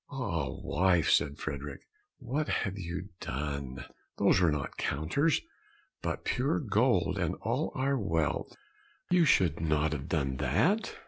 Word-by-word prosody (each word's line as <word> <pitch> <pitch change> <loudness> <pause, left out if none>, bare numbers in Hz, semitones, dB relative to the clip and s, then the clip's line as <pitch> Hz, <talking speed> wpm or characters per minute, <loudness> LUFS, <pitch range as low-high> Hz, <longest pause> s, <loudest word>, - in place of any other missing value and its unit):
"Ah, 100 - -2
wife," 90 +4 +2
said 70 0 +3
Frederick, 70 -1 -5 0.4
"what 140 +4 -2
have 100 -1 -1
you 90 +2 -5
done? 70 -1 -4 0.3
Those - - +4
were 85 -3 +4
not 75 -2 -3
counters, 105 - +1 0.6
but - - -3
pure - - +1
gold, - - +2
and - - 0
all - - 0
our 135 +1 +1
wealth; 80 - -1 0.6
you 175 -2 +5
should 90 - +3
not 75 -1 +1
have 70 -3 -4
done 65 -4 0
that." 210 - +1
80 Hz, 135 wpm, -30 LUFS, 75-120 Hz, 0.6 s, you